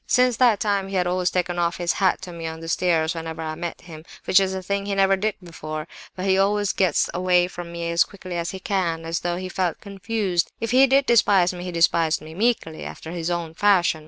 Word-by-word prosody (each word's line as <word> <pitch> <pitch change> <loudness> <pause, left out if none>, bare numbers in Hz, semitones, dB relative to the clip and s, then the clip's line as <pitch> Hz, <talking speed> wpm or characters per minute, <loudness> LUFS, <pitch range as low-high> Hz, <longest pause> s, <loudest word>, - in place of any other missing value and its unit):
"Since 250 -2 +3
that 240 -5 +4
time 200 -2 0
he 195 - -5
has 180 -1 +2
always 180 0 0
taken 175 -1 -1
off 170 0 0
his 175 -1 0
hat 190 -1 +2
to 180 - -7
me 165 -1 -6
on 160 0 -6
the 165 - -8
stairs, 165 -2 +1
whenever 160 -1 -6
I 155 0 -3
met 170 +1 -6
him, 160 -3 -11 0.2
which 190 - +5
is 190 -1 0
a 190 - -5
thing 200 +1 -2
he 200 - -1
never 195 0 +4
did 210 +2 -1
before; 155 -2 -7 0.3
but 185 - -4
he 190 0 +3
always 205 0 +1
gets 185 -5 +2
away 180 0 +2
from 175 -1 -8
me 170 0 -4
as 170 0 +4
quickly 185 -3 -9
as 170 0 -2
he 190 - -6
can, 175 -4 -1
as 165 0 -2
though 175 0 -2
he 185 +1 -5
felt 185 -2 -2
confused. 200 -2 -2
If 230 -1 -3
he 265 +2 +6
did 270 +1 +3
despise 195 -7 +4
me, 180 0 -7
he 180 - -4
despised 165 -1 +2
me 155 +1 -11
'meekly,' 200 -5 -1
after 160 - -8
his 170 -1 -3
own 170 -2 -3
fashion. 180 -4 +3
180 Hz, 245 wpm, -23 LUFS, 170-195 Hz, 0.3 s, he